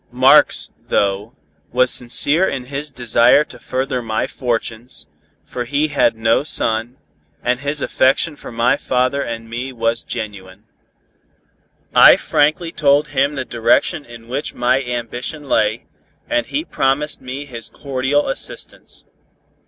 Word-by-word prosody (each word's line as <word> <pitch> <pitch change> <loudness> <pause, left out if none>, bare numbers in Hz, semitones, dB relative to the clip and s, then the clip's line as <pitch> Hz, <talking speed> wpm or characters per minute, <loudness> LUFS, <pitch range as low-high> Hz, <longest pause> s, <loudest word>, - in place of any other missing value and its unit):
Marx, - - +4 0.2
though, 100 +5 -1 0.4
was 125 +1 +3
sincere 145 +8 +4
in 130 -2 -5
his 140 +3 -5
desire 120 +2 +4
to 125 -5 -12
further 130 +1 -3
my 110 -2 -2
fortunes, 115 - -4 0.4
for 125 - -5
he 145 +5 0
had 140 -5 +2
no 115 0 +2
son, 115 -3 0 0.5
and 125 0 0
his 145 +1 -2
affection 135 +4 +1
for - - -11
my 115 +3 +2
father 130 +2 0
and 115 -3 -5
me 120 +3 -5
was 115 -1 -1
genuine. 105 -3 -7 1.3
I - - +8
frankly 155 +3 0
told 145 -1 +2
him 140 +1 0
the 130 -2 -3
direction 120 +6 +1
in 120 -2 -13
which 130 +4 -4
my 125 +2 +1
ambition 125 +4 -5
lay, - - 0 0.4
and 300 0 -1
he 300 +3 -3
promised 140 - -1
me 130 +3 -6
his 115 -5 -7
cordial 135 +1 -1
assistance. 135 - -5
125 Hz, 135 wpm, -18 LUFS, 115-140 Hz, 1.3 s, I